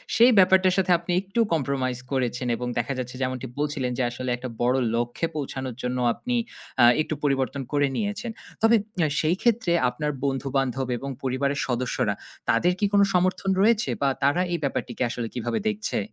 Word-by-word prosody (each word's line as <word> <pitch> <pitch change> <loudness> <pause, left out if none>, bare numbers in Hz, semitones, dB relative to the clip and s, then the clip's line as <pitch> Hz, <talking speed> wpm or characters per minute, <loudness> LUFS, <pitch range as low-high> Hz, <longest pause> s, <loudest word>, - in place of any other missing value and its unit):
সেই 240 +2 +7
ব্যাপারটার 185 0 +5
সাথে 185 -1 +2
আপনি 170 - -5
একটু 195 +4 -4
কম্প্রোমাইজ 130 -4 -1
করেছেন 125 -2 -1
এবং 125 +2 -4
দেখা 120 +4 0
যাচ্ছে 125 0 -5
যেমনটি 130 0 -2
বলছিলেন 145 -4 -1
যে 130 - +1
আসলে 130 +1 -4
একটা 125 0 -6
বড় 125 +2 +3 0.2
লক্ষ্যে 120 +7 -1
পৌঁছানোর 130 -4 -4
জন্য 125 +1 -1 0.2
আপনি 245 0 -3 0.5
আ - - +9 0.2
একটু 155 - -2
পরিবর্তন 135 0 0
করে 145 -1 +3
নিয়েছেন। 215 +2 -2 0.3
তবে 225 +1 +6 0.3
আ - - +2
সেইক্ষেত্রে 190 +4 +1 0.2
আপনার 150 +5 -2
বন্ধু-বান্ধব 135 -1 -1
এবং 140 +3 -6
পরিবারের 135 +2 0
সদস্যরা, 125 0 0 0.4
তাদের 180 +1 +3
কি 205 - +2
কোন 200 - +6
সমর্থন 185 +2 +1
রয়েছে 225 +2 +3
বা 140 - +3
তারা 145 +6 +3
এই 170 - 0
ব্যাপারটিকে 140 - -2
আসলে 120 -1 -3
কিভাবে 120 -1 -2
দেখছে? 215 0 -2
140 Hz, 165 wpm, -25 LUFS, 125-185 Hz, 0.5 s, আ